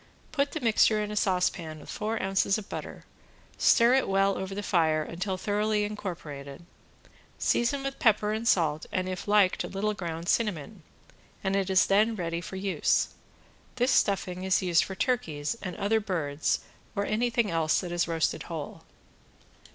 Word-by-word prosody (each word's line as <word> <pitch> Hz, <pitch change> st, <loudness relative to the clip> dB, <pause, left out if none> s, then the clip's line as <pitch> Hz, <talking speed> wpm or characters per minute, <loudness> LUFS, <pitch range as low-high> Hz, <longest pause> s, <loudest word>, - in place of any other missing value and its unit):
Put 285 Hz, -2 st, 0 dB
the 315 Hz, -, -2 dB
mixture 225 Hz, -3 st, +3 dB
in 210 Hz, 0 st, -3 dB
a -, -, -4 dB
saucepan 180 Hz, -5 st, 0 dB
with -, -, -10 dB
four 220 Hz, +1 st, -2 dB
ounces 195 Hz, +1 st, +2 dB
of 215 Hz, -2 st, -8 dB
butter, -, -, -7 dB, 0.5 s
stir 235 Hz, +1 st, +5 dB
it 265 Hz, -5 st, +2 dB
well 195 Hz, 0 st, +3 dB
over 190 Hz, +1 st, -5 dB
the 205 Hz, -, -4 dB
fire 160 Hz, -5 st, +2 dB
until 180 Hz, +4 st, -3 dB
thoroughly 210 Hz, +2 st, 0 dB
incorporated, 170 Hz, -8 st, -6 dB, 0.7 s
season 255 Hz, +4 st, +1 dB
with 275 Hz, 0 st, -4 dB
pepper 210 Hz, -2 st, +3 dB
and 225 Hz, +2 st, -3 dB
salt 155 Hz, -6 st, +2 dB
and 185 Hz, 0 st, -1 dB
if 185 Hz, +1 st, -5 dB
liked 205 Hz, -3 st, +3 dB
a -, -, -4 dB
little 210 Hz, +2 st, -1 dB
ground 170 Hz, -3 st, -5 dB
cinnamon, 205 Hz, -3 st, -1 dB, 0.6 s
and 195 Hz, 0 st, 0 dB
it 195 Hz, -1 st, 0 dB
is 190 Hz, -1 st, +5 dB
then 215 Hz, +3 st, +3 dB
ready 170 Hz, -3 st, -3 dB
for 185 Hz, -, -8 dB
use. 190 Hz, 0 st, +1 dB, 0.7 s
This 255 Hz, +1 st, +2 dB
stuffing 185 Hz, -2 st, +1 dB
is 190 Hz, 0 st, +2 dB
used 175 Hz, -2 st, +3 dB
for 190 Hz, -, -6 dB
turkeys 165 Hz, -, -1 dB
and 185 Hz, -3 st, -5 dB
other 215 Hz, +3 st, +1 dB
birds 160 Hz, -8 st, -1 dB, 0.3 s
or 200 Hz, 0 st, 0 dB
anything 235 Hz, 0 st, 0 dB
else 160 Hz, -1 st, +2 dB
that 180 Hz, -2 st, -6 dB
is 175 Hz, 0 st, 0 dB
roasted 165 Hz, -1 st, 0 dB
whole. -, -, -6 dB
195 Hz, 165 wpm, -28 LUFS, 170-215 Hz, 0.7 s, stir